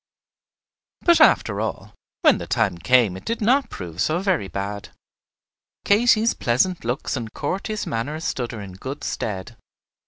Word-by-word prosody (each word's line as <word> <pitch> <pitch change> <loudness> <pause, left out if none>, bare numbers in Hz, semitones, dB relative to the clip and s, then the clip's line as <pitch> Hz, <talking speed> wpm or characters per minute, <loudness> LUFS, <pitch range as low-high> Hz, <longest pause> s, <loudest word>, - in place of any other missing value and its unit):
But 340 -2 +4
after 105 - +4
all, 105 -2 -4 0.3
when - - +5
the - - -6
time 85 - 0
came 110 +1 +3
it 95 - -9
did 230 - -2
not 260 +6 +2
prove 85 -2 -6
so 155 +10 +1
very 185 - 0
bad. 100 +3 -5 1.0
Katy's 225 +2 +4
pleasant 150 +10 0
looks 125 +6 -2
and 115 -4 -5
courteous 195 +8 -3
manner 130 +7 -3
stood 125 -6 -3
her 115 - -7
in 100 -2 -8
good 130 +10 -7
stead. 95 -4 -4
120 Hz, 150 wpm, -23 LUFS, -, 1.0 s, when